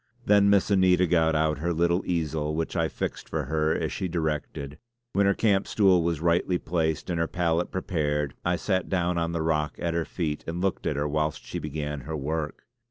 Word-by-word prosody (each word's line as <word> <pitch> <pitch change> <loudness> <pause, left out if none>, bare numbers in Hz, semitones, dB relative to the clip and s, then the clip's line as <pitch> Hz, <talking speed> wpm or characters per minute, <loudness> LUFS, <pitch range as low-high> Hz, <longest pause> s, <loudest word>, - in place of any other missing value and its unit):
Then 100 -1 +5
Miss 100 0 +3
Anita 95 -2 +4
got 80 -2 +2
out 75 -1 +1
her 85 +3 -1
little 85 +2 +2
easel 80 -3 -1
which 80 0 -2
I - - +2
fixed - - -5
for - - -1
her 80 0 0
as - - -2
she 95 - -2
directed; 75 -3 -3 0.3
when 100 0 +3
her 100 - +3
camp 100 -3 +2
stool 95 -4 +4
was 85 -2 -1
rightly 85 +2 +2
placed 80 0 -1
and 85 - -1
her 85 - +1
palette 85 -1 0
prepared 75 -6 -1
I 90 0 +1
sat 95 0 -1
down 90 -2 +1
on 85 0 -1
the 85 -1 -1
rock 75 -2 0
at 85 -1 -2
her 85 -1 0
feet 75 -4 -3
and 85 +1 -3
looked 95 0 -1
at - - 0
her 70 +1 0
whilst 75 0 -1
she 90 - -4
began 75 -1 -4
her 80 +5 -5
work. 75 +2 -3
85 Hz, 210 wpm, -26 LUFS, 75-90 Hz, 0.3 s, Then